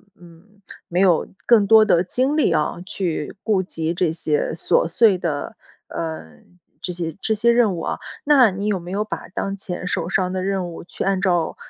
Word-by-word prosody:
嗯， 180 +4 -19 0.3
没 175 +1 0
有 180 -4 +4 0.2
更 220 -4 +5
多 220 0 +7
的 175 -2 +3
精 260 +10 0
力 295 - +2
啊， 155 -2 0
去 175 -5 -3
顾 205 -4 +1
及 165 -2 -3
这 175 -2 0
些 155 -2 -1
琐 165 - +1
碎 205 +1 +4
的， 155 -5 -3 0.3
呃， 160 - -6 0.4
这 180 - -3
些 170 -3 -4
这 220 - 0
些 225 +3 +2
任 230 -6 +3
务 - - -5
啊。 - - -3 0.3
那 265 -8 +6
你 200 +3 -4
有 205 -3 +1
没 175 +1 -9
有 210 +2 -1
把 - - -6
当 195 +1 -3
前 180 -2 -6
手 170 -3 -2
上 185 -1 0
的 185 0 -2
任 190 -2 -1
务， - - -9
去 - - -6
按 195 -1 +1
照， 175 -4 +1
185 Hz, 210 characters per minute, -21 LUFS, 170-210 Hz, 0.4 s, 多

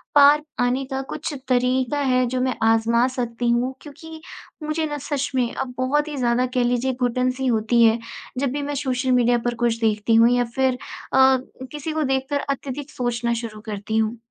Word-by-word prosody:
पार 290 +1 +7 0.2
आने 250 +2 +1
का 265 0 -1
कुछ 300 - -4 0.2
तरीका 255 +2 +1
है 255 -2 +2
जो 255 +1 -2
मैं 255 -1 0
आज़मा 225 +2 +3
सकती 240 -2 -2
हूँ 245 +2 +1
क्योंकि 315 +2 -11 0.4
मुझे 310 +1 -1
ना 295 - -4
सच 280 -1 -1
में 245 -2 0
अब 250 -2 -4
बहुत 295 +4 +1
ही 290 - -5
ज़्यादा 245 0 +1
कह 250 - +3
लीजिए 245 +2 0
घुटन-सी 255 +2 0
होती 230 0 +3
है, 225 +1 +4 0.4
जब 275 -2 0
भी 290 +1 -3
मैं 290 0 -3
सोशल 255 0 0
मीडिया 245 -1 +4
पर 240 0 0
कुछ 230 -1 0
देखती 220 0 +2
हूँ 230 +1 +6
या 245 0 +3
फिर 265 -1 +2 0.4
अ, 265 0 +6 0.3
किसी 300 +1 -5
को 315 - 0
देखकर 270 +1 0
अत्यधिक 275 +1 -4
सोचना 240 -1 -1
शुरू 215 -2 -7
करती 210 +1 -3
हूँ। 220 +1 0
255 Hz, 190 wpm, -22 LUFS, 235-270 Hz, 0.4 s, पार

